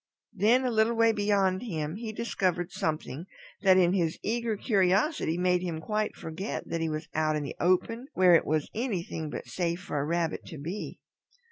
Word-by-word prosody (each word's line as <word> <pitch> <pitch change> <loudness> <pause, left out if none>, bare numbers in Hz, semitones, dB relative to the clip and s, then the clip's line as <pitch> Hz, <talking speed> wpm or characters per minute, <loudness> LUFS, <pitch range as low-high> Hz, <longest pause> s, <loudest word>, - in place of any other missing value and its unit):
Then 225 +6 +3
a 250 - +1
little 220 +1 +2
way 230 0 +5
beyond 200 -3 +1
him 160 -6 -3
he 225 -1 -5
discovered 185 -5 -1
something 160 -3 -3 0.3
that 190 -2 +6
in 180 -1 +4
his 170 -4 0
eager 230 -1 -1
curiosity 195 - +2
made 180 0 +2
him 170 -3 -3
quite 210 +5 -2
forget 165 +6 -5
that 165 - -2
he 165 - 0
was 155 +1 -4
out 155 0 +1
in 150 - -1
the 140 - -6
open 225 +8 +1
where 180 -1 +6
it 165 - +6
was 155 0 +1
anything 180 -9 -3
but - - -6
safe 170 -1 -2
for 165 -6 -3
a - - 0
Rabbit 170 +1 -1
to 160 - -8
be. 170 +9 -5
185 Hz, 190 wpm, -28 LUFS, 165-215 Hz, 0.3 s, that